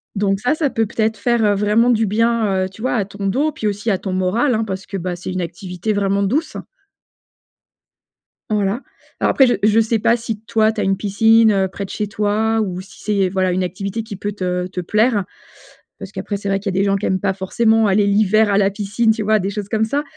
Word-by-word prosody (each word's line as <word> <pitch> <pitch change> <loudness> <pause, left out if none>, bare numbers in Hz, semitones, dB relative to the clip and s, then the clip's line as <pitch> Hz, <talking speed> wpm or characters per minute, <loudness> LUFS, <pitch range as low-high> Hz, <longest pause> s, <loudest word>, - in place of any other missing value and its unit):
donc 195 -1 0
ça, 245 +7 +1
ça 310 -2 0
peut 225 -2 0
peut-être 220 0 -1
faire 215 -1 +2
vraiment 210 +4 +3
du 225 -2 +3
bien, 215 -2 +1
heu, - - -6
tu 205 +3 -14
vois 255 - 0
à 205 -5 0
ton 200 0 -7
dos 280 +10 +1
puis 220 - -7
aussi 205 +2 -2
à 195 - +2
ton 190 0 -5
moral, 190 +9 +1
hein, 225 0 0
parce 195 -2 -5
que 195 - -5
bah 180 -1 -3
c'est 180 +1 -6
une 185 - -2
activité 180 +3 -4
vraiment 200 -1 0
douce. 265 +12 -1 1.9
Voilà. 210 +3 0 0.4
Alors - - +2
après, 270 - +5
je 245 - +2
je 215 +1 +4
sais 225 0 +1
pas 235 +3 +3
si, 225 -2 -5
toi, 220 0 +2
tu 220 -1 -4
as - - 0
une 195 0 +1
piscine 210 -1 +3
près 200 - -5
de - - -13
chez 210 - -3
toi 215 +2 0
ou 185 -3 -3
si 190 - -15
c'est, 200 -3 +1
voilà, 185 -1 0
une 185 +1 0
activité 195 +5 -4
qui 220 -2 -8
peut 205 +2 -4
te 180 -2 -2
te 185 -1 -5
plaire 210 +2 +1 0.8
parce - - -8
qu'après, 205 - -4
c'est 200 0 -5
vrai 195 - +1
qu'il 195 -1 -3
y - - 0
a - - +2
des 200 - +2
gens 200 0 +2
qui 195 - -4
aiment 190 - 0
pas 195 -1 +1
forcément 220 +3 +2
aller 200 +1 +3
l'hiver 210 +1 +3
à 200 - +3
la 195 -1 +3
piscine, 210 +3 0
tu 220 -1 -2
vois, 215 +1 +3
des 195 +1 -2
choses 205 -1 -5
comme 220 +1 +1
ça. 285 +6 -1
205 Hz, 240 wpm, -19 LUFS, 195-220 Hz, 1.9 s, après